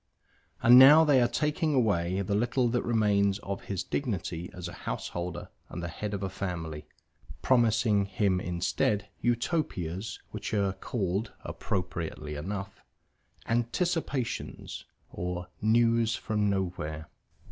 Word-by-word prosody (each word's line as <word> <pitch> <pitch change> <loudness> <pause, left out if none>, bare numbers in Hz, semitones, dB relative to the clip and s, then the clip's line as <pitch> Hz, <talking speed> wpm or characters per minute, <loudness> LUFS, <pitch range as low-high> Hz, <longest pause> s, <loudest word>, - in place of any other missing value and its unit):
And 120 +2 +9
now 150 +5 +9
they 140 -4 +5
are 120 - +4
taking 150 +4 0
away 95 -6 +1
the 100 +1 -2
little 120 +4 +2
that 120 +1 +1
remains 100 -4 +2
of 100 -1 -6
his 95 -2 -3
dignity 90 - -3
as 90 0 -7
a 85 - -8 0.2
householder 85 0 -4 0.2
and 85 - -6
the 85 - -3
head 105 +4 -4
of 100 - -4
a - - 0
family, 80 -6 -5 0.6
promising 110 -4 +3
him 100 -2 +1
instead 90 +3 0
Utopias 115 - -1
which - - -4
are 100 -2 +1
called 95 0 -2
(appropriately 85 -4 -4
enough) 95 +6 -5 0.7
"Anticipations" 130 +2 -2 0.3
or 90 0 -4
"News 115 +1 +3
from 105 -1 0
Nowhere." 85 -5 -3
100 Hz, 125 wpm, -29 LUFS, 90-120 Hz, 0.7 s, And